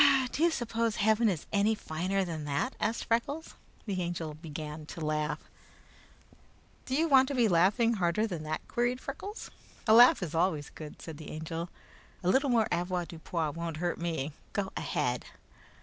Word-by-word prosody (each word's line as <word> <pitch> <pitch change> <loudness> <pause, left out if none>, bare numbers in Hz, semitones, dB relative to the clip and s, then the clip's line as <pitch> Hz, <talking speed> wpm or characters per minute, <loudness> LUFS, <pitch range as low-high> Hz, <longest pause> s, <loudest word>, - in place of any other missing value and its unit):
"Do - - -3
you 340 - +6
suppose 230 -6 -1
Heaven 220 +2 +3
is 170 -6 -2
any 210 +2 +3
finer 185 +2 -1
than 160 -3 -4
that?" 145 - -1
asked 225 +2 -1
Freckles. 280 +8 -1 0.3
The 195 -4 -2
Angel 170 -3 -3
began 155 -1 -7
to - - -8
laugh. 150 0 -1 1.4
"Do 260 - 0
you 325 +3 +3
want 265 -3 +6
to 280 - -2
be 240 -3 +4
laughing 200 +6 +4
harder 185 +1 +1
than 175 -8 -4
that?" 155 0 -4
queried 245 +1 0
Freckles. 390 - -7 0.3
"A 220 - +5
laugh 240 -3 +8
is 165 -2 -4
always 165 -3 +1
good," 155 -2 -9
said 160 -3 -7
the 155 - -9
Angel. 165 +2 -4 0.5
"A 180 - +2
little 270 +7 +3
more 230 -3 +3
avoirdupois 170 -2 -2
won't 165 0 -4
hurt 175 +2 -1
me. 160 -4 -2 0.2
Go 195 -2 -1
ahead." 125 0 -1
180 Hz, 165 wpm, -30 LUFS, 160-230 Hz, 1.4 s, laugh